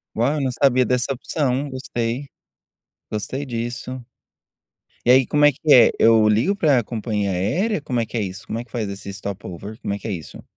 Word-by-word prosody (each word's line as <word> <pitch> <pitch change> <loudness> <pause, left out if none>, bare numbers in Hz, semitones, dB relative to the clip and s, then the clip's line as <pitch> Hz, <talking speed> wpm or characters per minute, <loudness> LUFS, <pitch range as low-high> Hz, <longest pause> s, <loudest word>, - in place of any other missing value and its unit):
Uau, 120 +6 +2
eu 145 - -1
não 130 -2 0
sabia 130 -1 +3
dessa 125 +1 0
opção, 135 +1 -1
gostei, 130 0 -3 0.8
gostei 130 +6 -4
disso. 120 +1 -5 1.0
E - - +1
aí 130 -1 +6
como 150 0 +3
é 145 - +7
que - - -22
é? 120 -3 +8
Eu 110 -1 +5
ligo 115 - +3
pra 140 - +3
companhia 105 -3 -2
aérea? 160 - 0
Como 125 -5 -2
é - - -1
que 115 - -5
é - - 0
isso, 100 +3 -5
como 115 - -3
é - - -5
que 115 - -28
faz 110 -4 -3
esse 100 0 -7
stop-over, 100 +1 -7
como 100 - -3
é 100 - -4
que - - -7
é - - -2
isso? 85 -4 -7
120 Hz, 205 wpm, -22 LUFS, 105-130 Hz, 1.0 s, é